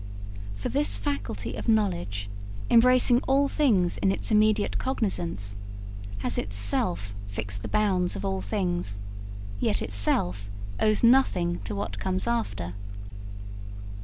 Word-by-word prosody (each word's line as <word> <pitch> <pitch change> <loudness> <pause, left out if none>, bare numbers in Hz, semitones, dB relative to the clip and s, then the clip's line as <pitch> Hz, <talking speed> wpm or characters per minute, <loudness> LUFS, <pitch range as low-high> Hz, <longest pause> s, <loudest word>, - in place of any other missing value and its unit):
For 100 - -4
this 100 +1 +2
faculty 100 +3 -3
of - - -4
knowledge, 175 - 0 0.4
embracing 245 +1 +6
all 275 +1 +4
things 215 - +2
in 195 - +3
its 195 - -2
immediate 215 -1 +3
cognizance, 170 - -2 0.7
has - - +1
itself 100 -1 0
fixed 100 0 -5
the - - -5
bounds 195 -4 +1
of - - -5
all 190 -1 -1
things, 175 - -2 0.6
yet 100 - +1
itself 100 -1 0 0.3
owes 215 +1 +3
nothing 185 -9 +4
to - - -4
what 200 - -4
comes 185 0 0
after. 225 - -2
180 Hz, 120 wpm, -27 LUFS, -, 0.7 s, embracing